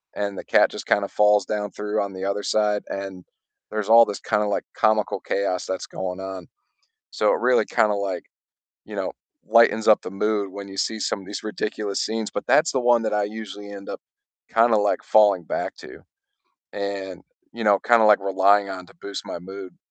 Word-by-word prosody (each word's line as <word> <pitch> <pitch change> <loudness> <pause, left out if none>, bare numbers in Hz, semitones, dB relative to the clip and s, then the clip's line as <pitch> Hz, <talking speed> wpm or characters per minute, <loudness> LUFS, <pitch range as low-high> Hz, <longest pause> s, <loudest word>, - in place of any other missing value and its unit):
and 100 -1 -3
the - - -6
cat - - +3
just - - -8
kind 100 - +2
of - - -5
falls 105 0 +4
down 105 -1 -3
through 105 +2 -2
on 100 -1 -4
the 95 +1 -5
other 100 +1 -1
side, 105 -1 +1
and 95 -2 -6 0.5
there's 110 0 -3
all 115 0 +8
this 100 - -5
kind 105 -1 0
of 105 - -1
like - - -1
comical 110 -1 +1
chaos 95 -2 -2
that's 95 - -3
going 95 0 -5
on. 95 -2 -7 0.6
So - - +2
it - - -3
really - - +3
kind 105 - +2
of 100 - 0
like, 100 -1 -3 0.6
you - - -9
know, - - -2 0.4
lightens 110 -1 +4
up 110 - +6
the - - -6
mood 100 0 -1
when 100 +1 -8
you 95 0 -10
see 110 +2 -1
some 100 - -1
of - - -14
these 100 +2 -6
ridiculous 105 -1 -3
scenes, 110 -1 -2
but 105 - -4
that's 160 +1 +4
the 130 - 0
one 120 -1 +3
that 110 - -1
I 105 -1 +1
usually 105 -1 -7
end 100 -1 -9
up - - -5 0.5
kind 115 +1 +3
of 105 - +4
like 105 - +1
falling 105 -4 +4
back - - -3
to - - -12 0.7
and, 100 -2 -5 0.3
you 115 -1 -5
know, 100 -2 +5
kind 120 -1 +4
of 105 - +5
like 105 - +6
relying 100 +1 +3
on 90 -1 -7
to - - -19
boost 100 -1 -6
my - - -5
mood. 95 +1 -10
100 Hz, 215 wpm, -23 LUFS, 95-110 Hz, 0.7 s, all